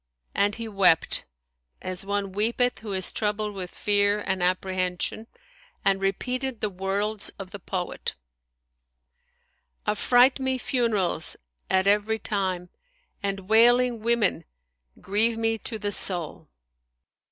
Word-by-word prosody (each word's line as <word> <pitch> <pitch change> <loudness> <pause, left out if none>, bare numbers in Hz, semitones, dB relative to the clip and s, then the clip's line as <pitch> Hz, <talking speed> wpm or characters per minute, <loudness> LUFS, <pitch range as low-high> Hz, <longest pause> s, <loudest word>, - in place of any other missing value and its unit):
"[FN#159] - - +3
and 205 0 +1
he 230 0 -5
wept 195 -6 +2 0.5
as 185 0 -5
one 200 -1 -1
weepeth 230 +3 +1
who 215 0 -7
is 190 -2 -1
troubled 210 0 -1
with 185 -2 -5
fear 205 +1 +2
and 190 -2 -2
apprehension, 185 +3 -1 0.6
and 195 0 +2
repeated 250 +6 -2
the 215 -1 -2
worlds 200 +3 0
of 190 -2 -8
the 205 - -7
poet, 180 -1 -4 1.7
"Affright 245 +5 +4
me 265 -1 0
funerals 225 - 0 0.3
at 190 0 +2
every 210 +2 +2
time; 190 -4 -2 0.3
* - - -42
And 200 -1 -2
wailing 240 +2 +4
women 230 -2 +1 0.5
grieve 220 +4 +3
me 225 0 0
to 225 - -4
the 205 -1 -3
soul!" 175 -5 0
205 Hz, 125 wpm, -26 LUFS, 190-225 Hz, 1.7 s, Affright